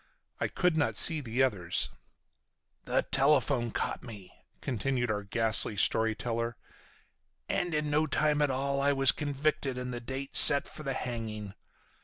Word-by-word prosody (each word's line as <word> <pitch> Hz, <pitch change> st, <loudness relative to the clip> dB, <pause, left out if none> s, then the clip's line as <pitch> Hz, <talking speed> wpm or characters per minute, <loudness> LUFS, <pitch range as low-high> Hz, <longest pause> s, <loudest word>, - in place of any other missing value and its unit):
I -, -, -1 dB
could 180 Hz, -3 st, -1 dB
not 145 Hz, -, -1 dB
see 160 Hz, -3 st, +6 dB
the 125 Hz, 0 st, -2 dB
others. 100 Hz, -10 st, -1 dB, 0.9 s
"The -, -, -1 dB
telephone 135 Hz, -3 st, +1 dB
caught -, -, -5 dB
me," 105 Hz, -7 st, -13 dB, 0.3 s
continued 125 Hz, 0 st, -3 dB
our 105 Hz, -1 st, -3 dB
ghastly 110 Hz, 0 st, 0 dB
story 110 Hz, +2 st, +2 dB
teller, 115 Hz, 0 st, -5 dB, 0.9 s
"and 175 Hz, -, -3 dB
in 150 Hz, -1 st, -3 dB
no 155 Hz, +1 st, 0 dB
time 150 Hz, 0 st, -1 dB
at 145 Hz, -, +1 dB
all 140 Hz, +1 st, -3 dB
I 140 Hz, +1 st, +1 dB
was 135 Hz, -1 st, +3 dB
convicted 145 Hz, -2 st, -3 dB
and 125 Hz, 0 st, -6 dB
the 120 Hz, -, -6 dB
date 135 Hz, +3 st, -8 dB
set 140 Hz, -1 st, +9 dB
for -, -, -11 dB
the 135 Hz, -3 st, -4 dB
hanging. 110 Hz, -4 st, -7 dB
130 Hz, 155 wpm, -28 LUFS, 115-145 Hz, 0.9 s, set